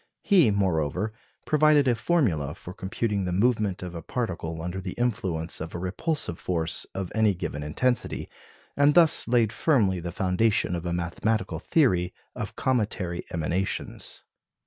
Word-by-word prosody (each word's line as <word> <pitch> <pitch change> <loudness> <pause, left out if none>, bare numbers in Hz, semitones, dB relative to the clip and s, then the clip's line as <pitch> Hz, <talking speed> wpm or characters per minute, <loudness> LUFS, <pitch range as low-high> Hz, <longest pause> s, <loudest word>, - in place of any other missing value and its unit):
He, 180 - +5
moreover, 95 0 0 0.3
provided 150 -2 +4
a 125 - +5
formula 110 - +1
for 90 - -9
computing 100 +1 -2
the 90 - -2
movement 105 -1 +1
of 90 -1 -6
a 85 - -6
particle 85 -6 -3
under 90 +2 -4
the - - -5
influence 95 -10 -2
of 80 +2 -6
a - - -1
repulsive 95 - -2
force 85 -3 -2
of 95 -2 -4
any 110 -3 +3
given 85 -4 -4
intensity, 120 +12 -1 0.5
and 145 +1 +4
thus 170 -3 +5
laid 115 -3 +3
firmly 110 - +2
the 85 0 -5
foundation 95 +2 +1
of 85 0 -4
a - - -1
mathematical 90 +6 -1
theory 95 - +2 0.2
of - - -5
cometary 105 -8 -1
emanations. 90 +3 -3
95 Hz, 145 wpm, -26 LUFS, 85-120 Hz, 0.5 s, He